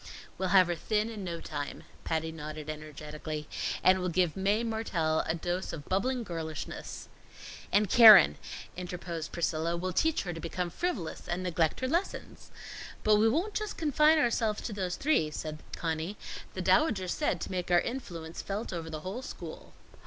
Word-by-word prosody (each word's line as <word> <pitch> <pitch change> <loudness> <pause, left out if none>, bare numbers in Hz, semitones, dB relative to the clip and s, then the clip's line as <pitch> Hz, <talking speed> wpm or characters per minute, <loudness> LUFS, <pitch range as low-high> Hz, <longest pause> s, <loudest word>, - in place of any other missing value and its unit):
"We'll 190 - 0
have 190 -1 +7
her 175 - -1
thin 215 +6 -1
in 210 -3 -6
no 170 -2 -4
time," 145 -3 -5 0.2
Patty 160 0 -1
nodded 155 -1 -6
energetically. 150 0 -7 0.4
"And 185 0 +6
we'll 180 0 -1
give 175 -2 +1
Mae 200 +4 +1
Mertelle 195 -9 0
a 160 - +1
dose 175 +2 -3
of 145 -3 -7
bubbling 240 +6 0
girlishness." 160 - -6 0.6
"And 205 +2 +4
Keren," 210 - +9 0.4
interposed 175 -2 -5
Priscilla, 165 0 -1
"we'll 185 +1 -3
teach 320 - +2
her 175 -3 -4
to 165 - -7
become 175 +1 -3
frivolous 200 - -3
and 180 +1 -2
neglect 165 0 0
her 260 - 0
lessons." 340 +8 -3 0.5
"But 215 -1 +5
we 220 +2 +5
won't 345 - 0
just 425 -1 -3
confine 305 0 +4
ourselves 230 -6 +1
to 225 - -5
those 185 -3 -2
three," 275 - +2
said 155 0 -5 0.2
Conny. 165 +4 -3 0.4
"The - - -3
Dowager 220 - +3
said 295 - 0
to - - -4
make 180 -1 -3
our 175 -1 +6
influence 170 -10 -5
felt 205 +1 -4
over 165 -2 -4
the 155 -1 -5
whole 195 +9 -5
school." - - -9
180 Hz, 170 wpm, -30 LUFS, 160-215 Hz, 0.6 s, Keren